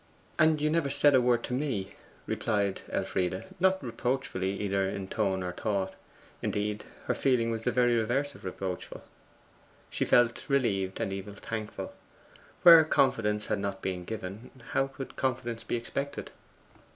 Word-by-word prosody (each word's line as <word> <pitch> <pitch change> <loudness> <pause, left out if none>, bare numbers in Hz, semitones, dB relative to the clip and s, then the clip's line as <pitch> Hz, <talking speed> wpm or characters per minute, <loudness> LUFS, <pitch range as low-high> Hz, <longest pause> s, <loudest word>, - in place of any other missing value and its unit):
'And 155 0 +5
you 150 +1 +1
never 165 -3 +1
said 145 +1 +4
a 130 - +6
word 120 -1 +2
to - - -4
me,' 125 -8 -1 0.3
replied 100 -3 0
Elfride, 90 0 -1
not 190 -1 +3
reproachfully 115 -6 -2
either 100 -1 0
in 95 0 -4
tone 95 -3 0
or 90 - -2
thought. 95 0 -2 0.5
Indeed, 105 0 -2 0.2
her - - +1
feeling 120 -4 +2
was 115 0 -4
the 125 - +3
very 120 -1 +3
reverse 130 +6 0
of - - -15
reproachful. 95 -1 -5 0.9
She - - 0
felt 120 +2 +3
relieved 100 -9 +1
and 95 - -1
even 100 +1 -6
thankful. 110 0 -5 0.7
Where 165 -2 +11
confidence 110 -8 +2
had - - -1
not 100 -1 -4
been 90 -1 -2
given, 105 +2 -6 0.2
how 135 - +2
could 135 0 -8
confidence 120 -3 -2
be - - -2
expected? 140 +4 -4
115 Hz, 150 wpm, -29 LUFS, 100-130 Hz, 0.9 s, Where